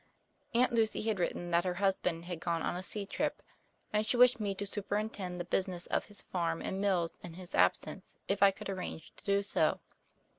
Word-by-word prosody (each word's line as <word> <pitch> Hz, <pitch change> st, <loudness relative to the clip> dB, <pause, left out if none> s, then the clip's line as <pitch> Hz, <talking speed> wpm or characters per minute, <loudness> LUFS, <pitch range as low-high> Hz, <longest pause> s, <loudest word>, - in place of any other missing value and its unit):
Aunt 245 Hz, +1 st, +4 dB
Lucy 225 Hz, -2 st, +2 dB
had 220 Hz, -3 st, 0 dB
written 175 Hz, 0 st, -1 dB
that 170 Hz, 0 st, +4 dB
her 180 Hz, -1 st, -1 dB
husband 180 Hz, -3 st, 0 dB
had 175 Hz, -2 st, -4 dB
gone 170 Hz, -1 st, -1 dB
on -, -, -1 dB
a 180 Hz, -, -3 dB
sea 200 Hz, +2 st, -3 dB
trip -, -, -2 dB, 0.5 s
and 210 Hz, 0 st, +3 dB
she 240 Hz, -, +1 dB
wished 250 Hz, -1 st, +7 dB
me 200 Hz, -2 st, -1 dB
to 205 Hz, -, -3 dB
superintend 200 Hz, -2 st, -3 dB
the 175 Hz, -, -3 dB
business 180 Hz, -1 st, -1 dB
of -, -, 0 dB
his 205 Hz, -1 st, -9 dB
farm 165 Hz, -2 st, -1 dB
and 190 Hz, -, -3 dB
mills 180 Hz, -5 st, +2 dB
in 170 Hz, -2 st, -9 dB
his 180 Hz, -1 st, -10 dB
absence, 90 Hz, +1 st, +1 dB
if 195 Hz, 0 st, 0 dB
I 200 Hz, -, +9 dB
could 195 Hz, -, -6 dB
arrange 185 Hz, -4 st, -5 dB
to -, -, -12 dB
do 200 Hz, 0 st, +2 dB
so. 200 Hz, -, +2 dB
190 Hz, 210 wpm, -33 LUFS, 175-205 Hz, 0.5 s, I